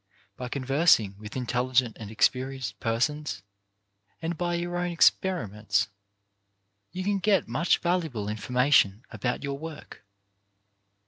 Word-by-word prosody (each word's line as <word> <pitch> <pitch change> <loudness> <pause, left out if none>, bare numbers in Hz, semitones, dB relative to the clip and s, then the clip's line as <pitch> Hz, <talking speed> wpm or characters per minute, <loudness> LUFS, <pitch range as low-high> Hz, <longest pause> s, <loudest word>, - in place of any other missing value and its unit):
By 125 +2 -6
conversing 135 - +3
with 105 +1 -9
intelligent 125 -1 +1
and 105 -3 -7
experienced 125 -2 0
persons, 130 0 -1 0.8
and 165 +1 -3
by 175 +1 -1
your 175 +1 -3
own 180 0 -1
experiments, 105 - +2 1.0
you 185 +1 -4
can 200 0 0
get 195 0 +2
much 150 +10 +2
valuable 160 - -1
in 105 +1 -3
formation 125 -3 +3
about 120 +3 -2
your 140 0 -3
work. 160 -1 -9
130 Hz, 120 wpm, -27 LUFS, 110-170 Hz, 1.0 s, conversing